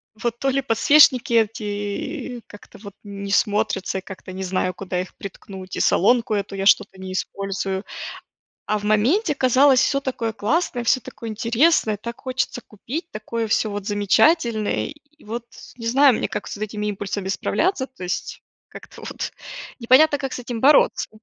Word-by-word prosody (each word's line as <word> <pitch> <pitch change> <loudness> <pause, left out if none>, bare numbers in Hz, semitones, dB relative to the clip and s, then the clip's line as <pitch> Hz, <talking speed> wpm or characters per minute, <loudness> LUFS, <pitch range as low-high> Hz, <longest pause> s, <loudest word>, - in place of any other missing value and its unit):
Вот 235 +1 -3
то 270 - -1
ли 270 +1 +1
подсвечники 255 +1 +5
эти 210 +2 -2
как-то, 205 - -15
вот, 200 -1 -11
не 200 -1 -7
смотрятся, 205 -1 +1
и - - -4
как-то 190 -1 -10
не 190 +1 -6
знаю, 185 0 -1
куда 180 -1 -3
их 185 - -7
приткнуть, 190 -1 -9
и - - -3
солонку 230 +2 +3
эту 200 -1 -3
я 195 - -3
что-то 200 -1 +3
не 185 0 -6
использую. 195 0 -3 0.8
А 215 - 0
в 205 - -9
моменте 255 - +2
казалось: 260 0 +4
всё 275 0 +2
такое 245 -4 -3
классное, 245 +3 -1
всё 255 - +3
такое 230 0 -8
интересное, 230 +2 +2
так 235 +4 -8
хочется 255 -1 -2
купить, 260 - -6
такое 225 +1 -4
всё, 215 0 +1
вот, 205 -1 -5
замечательное, 215 - +2 0.3
и - - -20
вот, 230 +2 -5 0.3
не 230 - -8
знаю, 270 +2 +5
мне - - -2
как - - -5
с - - -6
вот 210 - -8
этими 210 0 -5
импульсами 200 -1 -3
справляться, 260 - 0
то 260 -8 -15
есть 180 - -4 0.3
как-то - - -13
вот - - -5 0.5
непонятно, 280 +5 +5
как 270 -2 -4
с - - -4
этим 240 -2 -5
бороться. 285 +4 +4
220 Hz, 170 wpm, -22 LUFS, 200-255 Hz, 0.8 s, подсвечники